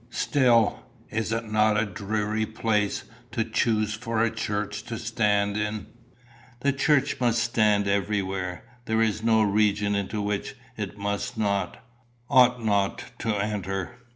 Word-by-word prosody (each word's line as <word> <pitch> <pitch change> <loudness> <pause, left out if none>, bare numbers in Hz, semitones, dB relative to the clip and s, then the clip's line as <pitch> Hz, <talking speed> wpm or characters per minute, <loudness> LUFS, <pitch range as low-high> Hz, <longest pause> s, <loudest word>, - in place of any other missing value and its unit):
'" - - -30 0.2
"Still, 120 -6 +3 0.3
is 110 0 -1
it 115 -1 -3
not 105 0 +3
a 110 - +1
dreary 105 +2 -2
place 105 -2 0 0.3
to 115 -2 +1
choose 110 -1 +1
for 115 0 -1
a 115 - +1
church 105 -1 -3
to 115 -1 -5
stand 105 -3 +1
in?" 105 0 -2 0.8
"The 140 +1 +2
church 140 0 +2
must 120 -2 +2
stand 105 -4 +2
everywhere. 95 -2 -1 0.2
There 110 -1 +2
is 110 -1 0
no 110 -1 +4
region 105 0 +2
into 100 +1 -2
which 105 0 -2 0.2
it 105 - -5
must 100 +4 -3
not, 100 0 -1 0.5
ought 125 -3 +5
not 100 -2 0
to 115 - -3
enter. 100 -2 -2
105 Hz, 145 wpm, -26 LUFS, 100-115 Hz, 0.8 s, ought